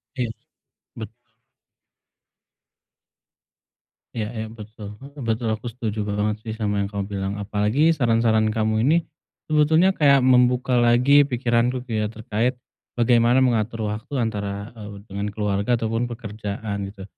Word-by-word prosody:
Iya. 125 Hz, -3 st, -1 dB, 0.7 s
Betul. 115 Hz, +2 st, -10 dB, 2.9 s
Iya 110 Hz, -2 st, -2 dB
iya, 110 Hz, -2 st, -5 dB
betul, 105 Hz, -1 st, -10 dB
heeh. 140 Hz, +1 st, -12 dB
Betul, 115 Hz, +1 st, 0 dB
aku 110 Hz, +2 st, -4 dB
setuju 110 Hz, -3 st, -4 dB
banget 105 Hz, +1 st, -1 dB
sih 110 Hz, -, -2 dB
sama 105 Hz, -2 st, -1 dB
yang 100 Hz, -, 0 dB
kamu 100 Hz, 0 st, -4 dB
bilang. 95 Hz, 0 st, -2 dB
Apalagi 105 Hz, +9 st, +1 dB
saran-saran 115 Hz, -6 st, +2 dB
kamu 110 Hz, 0 st, 0 dB
ini, 160 Hz, +3 st, +5 dB, 0.5 s
sebetulnya 160 Hz, +5 st, +4 dB
kayak 140 Hz, -7 st, +4 dB
membuka 125 Hz, 0 st, +3 dB
lagi 125 Hz, +4 st, +5 dB
pikiranku 125 Hz, -1 st, 0 dB
kayak 110 Hz, -3 st, -3 dB
terkait, 110 Hz, +3 st, -1 dB, 0.4 s
bagaimana 120 Hz, +1 st, +4 dB
mengatur 115 Hz, -3 st, 0 dB
waktu 110 Hz, +7 st, -6 dB
antara, 105 Hz, -3 st, -3 dB
eee, 105 Hz, -3 st, -10 dB
dengan 100 Hz, +1 st, -3 dB
keluarga 105 Hz, +2 st, 0 dB
ataupun 115 Hz, +1 st, -1 dB
pekerjaan, 105 Hz, -3 st, -5 dB
gitu. 100 Hz, 0 st, -10 dB
115 Hz, 125 wpm, -23 LUFS, 105-125 Hz, 2.9 s, ini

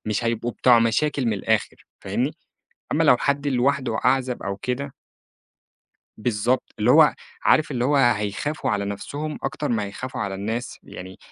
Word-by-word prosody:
مش 110 Hz, +2 st, -1 dB
هيبقوا 115 Hz, +1 st, -1 dB
بتوع 120 Hz, -2 st, +5 dB
مشاكل 125 Hz, +4 st, +1 dB
من 110 Hz, -, +2 dB
الآخر 100 Hz, -, 0 dB, 0.2 s
فاهمني؟ -, -, -2 dB, 0.6 s
أمّا -, -, +2 dB
لو -, -, +6 dB
حد 140 Hz, +1 st, -1 dB
لوحده 130 Hz, -2 st, +1 dB
أعزب 130 Hz, -1 st, +1 dB
أو 100 Hz, 0 st, -3 dB
كده 130 Hz, +6 st, -4 dB, 1.3 s
بالضبط، 120 Hz, +3 st, -1 dB
اللي 110 Hz, +4 st, +3 dB
هو 155 Hz, +1 st, +6 dB, 0.3 s
عارف 155 Hz, -1 st, +3 dB
اللي 125 Hz, -2 st, -1 dB
هو 145 Hz, +2 st, +2 dB
هيخافوا 120 Hz, +4 st, +1 dB
على 100 Hz, -1 st, 0 dB
نفسهُم 145 Hz, +10 st, -5 dB
أكتر 140 Hz, +2 st, -3 dB
ما 110 Hz, -3 st, 0 dB
هيخافوا 120 Hz, +5 st, -6 dB
على 100 Hz, -2 st, -2 dB
الناس 110 Hz, +5 st, -4 dB
يعني 95 Hz, +1 st, -10 dB
120 Hz, 155 wpm, -23 LUFS, 105-140 Hz, 1.3 s, لو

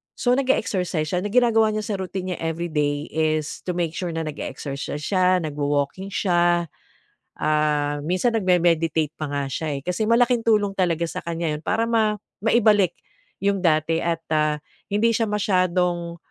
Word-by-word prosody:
so 245 Hz, -, +1 dB
nag-e-exercise 210 Hz, -, +1 dB
siya, 180 Hz, -, +1 dB
na 205 Hz, -, -3 dB
ginagawa 225 Hz, 0 st, +4 dB
niya 215 Hz, -, -2 dB
sa 205 Hz, -3 st, -3 dB
routine 185 Hz, 0 st, -4 dB
niya -, -, -4 dB
every 165 Hz, +1 st, -3 dB
day 145 Hz, 0 st, -1 dB
is 155 Hz, -1 st, -1 dB
to 180 Hz, -, -1 dB
make 170 Hz, -2 st, -1 dB
sure 170 Hz, 0 st, -4 dB
na 165 Hz, -, -1 dB
nag-exercise 145 Hz, -1 st, -5 dB
siya, 185 Hz, -1 st, +2 dB
nagwa-walking 145 Hz, +4 st, -2 dB
siya, 175 Hz, -4 st, +1 dB, 0.7 s
ah, 150 Hz, -1 st, +1 dB
minsan 185 Hz, +10 st, 0 dB
nagme-meditate 165 Hz, -6 st, +2 dB
pa 155 Hz, -, -2 dB
nga 140 Hz, 0 st, -2 dB
siya, 150 Hz, +1 st, -2 dB
eh. -, -, -5 dB
Kasi 215 Hz, +5 st, -1 dB
malaking 240 Hz, +1 st, +4 dB
tulong 210 Hz, -3 st, +2 dB
talaga 170 Hz, -4 st, 0 dB
sa 165 Hz, -, -4 dB
kaniya 170 Hz, -1 st, -2 dB
'yon 150 Hz, -, -4 dB
para 225 Hz, +7 st, 0 dB
ma 220 Hz, -2 st, +2 dB, 0.2 s
maibalik 210 Hz, -4 st, +3 dB, 0.5 s
'yong 200 Hz, -1 st, +2 dB
dati 160 Hz, -1 st, +2 dB
at, 165 Hz, -1 st, -2 dB
ah, 150 Hz, -1 st, +2 dB, 0.3 s
hindi 220 Hz, +3 st, +2 dB
siya 225 Hz, -1 st, +1 dB
masyadong, 180 Hz, -4 st, 0 dB
175 Hz, 160 wpm, -23 LUFS, 155-205 Hz, 0.7 s, ginagawa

